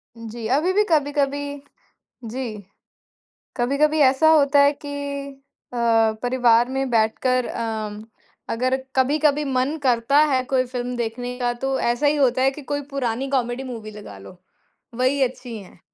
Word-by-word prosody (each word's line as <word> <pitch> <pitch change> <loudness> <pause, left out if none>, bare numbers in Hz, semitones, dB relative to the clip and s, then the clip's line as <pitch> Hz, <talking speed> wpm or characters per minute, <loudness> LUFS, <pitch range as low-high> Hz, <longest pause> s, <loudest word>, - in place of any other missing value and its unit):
जी, 230 0 -7
अभी 295 +9 +2
भी 415 +2 +4
कभी-कभी 285 -2 0 0.7
जी। 230 -4 -5 0.9
कभी-कभी 280 +5 +1
ऐसा 270 +3 +5
होता 290 -2 +4
है 285 0 +5
कि - - -5 0.8
अ, - - -6 0.5
परिवार 245 -1 +3
में 270 +1 -2
बैठकर 240 +2 +1
अम, 215 -2 -4 0.5
अगर 255 +3 0 0.2
कभी-कभी 295 +2 +2
मन 265 +2 0
करता 250 +1 +2
है 260 -1 +2
कोई 255 0 +1
फ़िल्म 245 0 -4
देखने 245 +1 -4
का, 245 -1 0
तो 265 +2 -2
ऐसा 240 +5 +1
ही 295 +1 +3
होता 260 -2 +2
है 265 - +4
कि 290 +2 -10
कोई 285 - 0
पुरानी 265 -1 -2
कॉमेडी 250 -1 -1
मूवी 230 -5 -7
लगा 210 - -11
लो। 100 - -13 0.6
वही 260 +2 +2
अच्छी 250 -2 -3
हैं। 190 -3 -15
255 Hz, 145 wpm, -22 LUFS, 235-280 Hz, 0.9 s, ऐसा